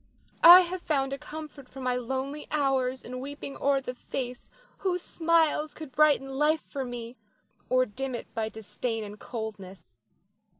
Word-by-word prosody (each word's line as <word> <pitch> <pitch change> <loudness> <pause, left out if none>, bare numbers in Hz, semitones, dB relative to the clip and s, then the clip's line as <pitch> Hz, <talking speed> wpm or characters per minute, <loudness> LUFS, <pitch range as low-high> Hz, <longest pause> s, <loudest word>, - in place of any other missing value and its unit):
I 350 +2 +12
have 365 0 -3
found 275 -4 0
a 275 - -4
comfort 300 -4 -9
for 270 - -11
my 250 -1 0
lonely 265 +4 -3
hours 265 -3 0
in 255 +1 -6
weeping 280 +1 -7
o'er 275 0 +2
the 250 -1 -5
face 250 0 -6 0.3
whose 360 -2 -1
smiles 320 -2 +1
could 310 -4 -8
brighten 270 -1 +3
life 305 +1 +3
for 275 - -4
me, 245 -1 -7 0.5
or 255 0 +4
dim 255 +3 -4
it - - -8
by 220 -1 -2
disdain 220 +1 -4
and 210 0 -9
coldness. 205 - -7
270 Hz, 160 wpm, -28 LUFS, 245-300 Hz, 0.5 s, I